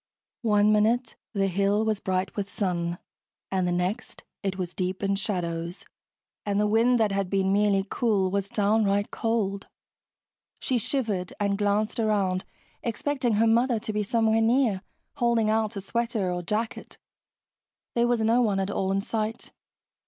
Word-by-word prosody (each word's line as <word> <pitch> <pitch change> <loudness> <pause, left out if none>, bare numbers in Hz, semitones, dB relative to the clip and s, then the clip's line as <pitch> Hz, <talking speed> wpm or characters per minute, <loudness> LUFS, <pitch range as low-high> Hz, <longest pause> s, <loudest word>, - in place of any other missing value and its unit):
One 210 -2 +4
minute 225 +4 +2 0.2
the 200 -2 +1
hill 200 +3 +1
was 215 -2 0
bright 190 -1 -2
with 200 -1 -3
sun, 175 -4 -2 0.5
and 185 -2 +1
the - - 0
next 180 +4 -2 0.2
it 195 -2 -2
was 180 -2 -4
deep 185 +1 -3
in 195 0 +2
shadows 175 -3 -3 0.6
and 205 -1 0
the 210 - +3
wind 230 +3 +3
that 215 -2 +2
had 195 -2 -1
been 195 0 +1
merely 200 -1 +2
cool 200 -4 +1
was 200 0 -1
downright 205 -1 +1
cold. 210 -4 -1 0.9
She 255 -2 0
shivered 210 -7 -2
and 200 -1 +1
glanced 210 +2 0
around 200 -4 +1 0.4
expecting 245 +1 -1
her 215 +2 +3
mother 235 +2 +3
to 215 0 -4
be 210 - 0
somewhere 225 +1 +2
near, 225 -4 +2 0.4
holding 235 -4 +2
out 220 -1 0
a 200 - -4
sweater 225 -2 -1
or 175 0 -2
jacket. 215 +6 -3 1.0
There 235 0 +2
was 240 -2 +1
no 230 +3 +3
one 205 -5 +1
at 195 +1 -1
all 190 -1 -1
in 195 0 +1
sight. 220 +2 -3
205 Hz, 160 wpm, -26 LUFS, 195-225 Hz, 1.0 s, One